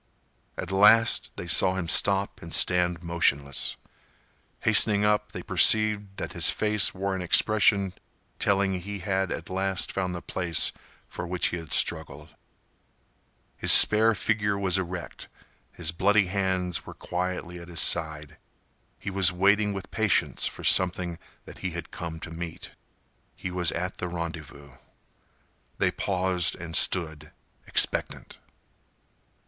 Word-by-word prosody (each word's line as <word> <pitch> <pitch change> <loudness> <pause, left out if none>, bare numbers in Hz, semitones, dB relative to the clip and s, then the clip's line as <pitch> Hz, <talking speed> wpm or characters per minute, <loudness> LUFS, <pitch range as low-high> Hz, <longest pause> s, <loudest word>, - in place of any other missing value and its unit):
At - - -6
last, 105 +4 +4
they - - -7
saw 90 +2 +2
him 90 -3 -4
stop 100 +3 +1
and 85 0 -3
stand 90 -1 +1
motionless. 70 -5 0 0.8
Hastening 105 0 +4
up, 105 0 0
they - - -8
perceived 105 -2 +2
that - - -6
his - - +3
face 105 -2 +2
wore 95 +1 -3
an 95 - -5
expression 100 +1 +3 0.5
telling 100 -1 +1
that 95 - -3
he 100 +3 -7
had 95 -1 -2
at - - -6
last 95 0 -1
found 90 -2 -3
the 85 - -6
place 90 -3 -2 0.4
for 90 - -7
which 90 0 -1
he 85 - -4
had 80 -2 -10
struggled. 75 -2 -1 1.3
His - - +2
spare 110 +1 +7
figure 105 -1 -1
was 95 -1 +1
erect; 90 -1 -7 0.4
his 80 -2 -2
bloody 100 +4 +2
hands 95 -2 -2
were - - -11
quietly 90 -1 -5
at 85 - -12
his 85 -2 -6
side. 75 -1 -1 0.6
He 95 - -6
was 95 -2 +4
waiting 100 +3 +2
with 95 -1 -8
patience 110 -4 0
for - - -8
something 90 -2 +2 0.3
that - - -13
he 90 -2 -5
had 85 - -8
come 85 -2 -7
to 80 - -8
meet. 85 0 -8 0.6
He 90 - -7
was 90 -2 0
at 90 +3 -5
the 90 - -4
rendezvous. 80 -4 -8 1.1
They - - +1
paused 90 -2 0
and 85 -1 -6
stood, 80 -4 +1 0.4
expectant. - - +1
90 Hz, 140 wpm, -26 LUFS, 85-100 Hz, 1.3 s, spare